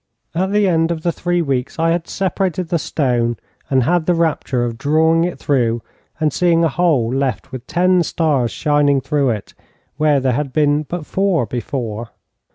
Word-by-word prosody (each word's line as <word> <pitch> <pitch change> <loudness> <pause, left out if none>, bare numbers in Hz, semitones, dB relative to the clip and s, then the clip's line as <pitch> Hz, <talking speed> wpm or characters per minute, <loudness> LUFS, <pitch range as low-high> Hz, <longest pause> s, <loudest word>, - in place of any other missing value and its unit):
At 190 +3 0
the 205 -1 +3
end 165 -2 +2
of 165 -2 -3
three 175 0 0
weeks 135 -4 -2
I 165 0 +2
had 170 0 -1
separated 185 -2 -2
the 170 - +1
stone, 120 -6 0 0.3
and 130 -2 +3
had 170 +3 +1
the 175 - +3
rapture 155 -6 0
of 115 -1 -5
drawing 160 +4 +3
it 175 - -4
through, 120 -5 0 0.4
and 155 -3 +1
seeing 170 -2 +3
a 165 - +3
hole 135 -8 +1
left 135 -1 -2
with 130 -1 -8
ten 180 +2 +3
stars 150 -7 +1
shining 145 -1 +2
through 135 0 0
it, 105 -4 -4 0.4
where 150 -2 +3
there 130 -1 +1
had 140 0 -2
been 150 -1 +2
but 155 +2 -6
four 190 -8 +1
before. 120 -2 -4
150 Hz, 175 wpm, -18 LUFS, 130-170 Hz, 0.4 s, the